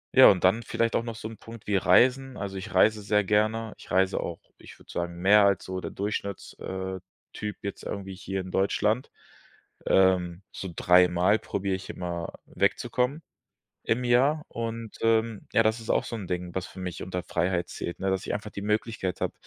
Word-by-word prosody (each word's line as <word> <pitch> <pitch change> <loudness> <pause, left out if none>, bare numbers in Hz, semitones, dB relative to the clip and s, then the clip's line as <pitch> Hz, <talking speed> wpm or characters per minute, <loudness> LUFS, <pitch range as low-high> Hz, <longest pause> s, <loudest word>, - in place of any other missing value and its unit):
Ja, - - +10
und 90 -3 +2
dann 95 +5 +4
vielleicht 115 0 0
auch - - +3
noch 115 -1 -5
so 110 - -6
'n 110 0 -10
Punkt 115 -1 -12
wie 105 - 0
Reisen. 130 +7 +4
Also 100 -1 -5
ich 95 0 -6
reise 105 +3 +4
sehr 105 +1 +2
gerne. 110 +2 +1
Ich - - -14
reise 95 +1 +2
auch 85 - -4 0.2
ich - - -13
würde - - -15
sagen, 85 0 -3
mehr 100 +4 +6
als 100 -2 +2
so 95 0 -4
der - - -4
Durchschnitts 100 -1 -4
äh, 95 0 -4 0.3
Typ 105 -1 -5
jetzt 100 - -5
irgendwie 95 -1 -5
hier 95 0 -4
in 90 0 -8
Deutschland. 105 +6 +1 0.8
Ähm, 95 -1 +3
so 95 - -6
dreimal 90 +3 +4
probiere 95 0 -2
ich 95 - -8
immer, 85 -1 -4
wegzukommen 135 +6 0 0.6
im 125 +2 0
Jahr. 135 +6 +3
Und, 115 -1 -5
ähm, 115 -1 +1
ja, 110 - +6
das 110 +1 +1
ist 110 - -11
auch - - +2
so 115 - -5
'n 100 -4 -6
Ding, 90 -1 -4
was 95 -1 -2
für 95 - -11
mich 90 -2 -5
unter 90 0 -4
Freiheit 85 +1 -1
zählt, 85 - -5
ne, 95 0 0
dass 95 -1 -1
ich - - -1
einfach 105 +1 -5
die 100 - -7
Möglichkeit 105 -3 -1
habe, - - 0
100 Hz, 200 wpm, -27 LUFS, 95-110 Hz, 0.8 s, Ja